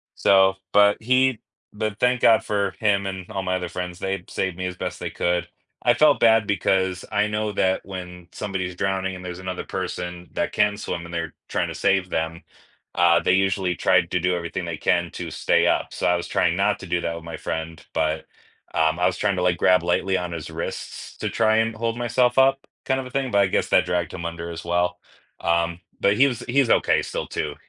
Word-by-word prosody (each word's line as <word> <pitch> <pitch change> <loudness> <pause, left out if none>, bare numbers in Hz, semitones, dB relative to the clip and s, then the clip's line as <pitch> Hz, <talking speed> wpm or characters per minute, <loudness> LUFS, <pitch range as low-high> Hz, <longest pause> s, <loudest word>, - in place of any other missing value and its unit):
so 95 -1 +4 0.2
but 105 0 +5
he 130 -1 +3 0.3
but 110 0 -3
thank 125 0 +2
god 110 -1 +5
for 100 -2 0
him 100 -2 +2
and 95 -2 -5
all 95 - -3
my 95 0 0
other 90 -1 -4
friends, 90 0 -5
they 95 -1 -3
saved 95 -2 -2
me 95 - -3
as 90 0 -4
best - - -4
they - - -4
could. 85 0 -1 0.3
I 120 - +5
felt 150 +4 +4
bad 110 -2 +5
because 95 -1 +1
I 105 +1 +2
know 105 0 -2
that 95 -1 0
when 90 -2 -8
somebody 95 -3 -3
is 90 - -6
drowning, 95 0 -1
and 90 - -9
there's 90 0 -6
another 95 0 -5
person 90 -1 -5
that - - -2
can 105 -1 +2
swim, 85 -4 -4
and 85 - -10
they're 85 -1 -3 0.2
trying - - 0
to - - -6
save 95 -2 +1
them, 80 +1 -3 0.5
uh, 85 -1 +5
they 90 - +2
usually 95 -1 +1
tried - - +3
to 90 - +1
do 90 +1 +1
everything 85 -1 -4
they - - -4
can 85 -1 +1
to 85 -2 -6
stay - - +2
up, - - 0
so - - -1
I 90 - +4
was 85 - -3
trying 85 - +1
not 100 +2 +1
to 95 - -9
do 90 0 0
that 85 - -2
with 85 - -8
my 85 - -6
friend, 80 0 -5
but, 80 0 0 0.5
um, 80 0 +2
I 90 - +2
was 90 0 +1
trying 100 -2 +1
to 90 - -1
like 90 -1 +2
grab 90 0 +4
lightly 95 +2 +1
on 90 -1 -4
his 85 -3 -6
wrists - - -6
to - - -3
try 110 0 +2
and 115 0 +1
hold 115 +1 -2
myself 120 +1 +1
up, 135 +1 +3 0.2
kind 130 0 +1
of - - -9
a 125 - -8
thing, 135 -1 -1
but 100 - +4
I 100 - +4
guess - - 0
that - - +4
dragged 85 -2 -1
him 85 -2 -6
under 85 0 -5
as 85 -1 -7
well, 90 +1 0 0.4
um, 85 0 0 0.2
but 100 +1 +3
he 135 - +6
was 120 -4 -3
he 135 +4 +2
was 125 - 0
okay - - +3
still - - -4
too. 75 -1 -3
95 Hz, 230 wpm, -23 LUFS, 85-105 Hz, 0.5 s, he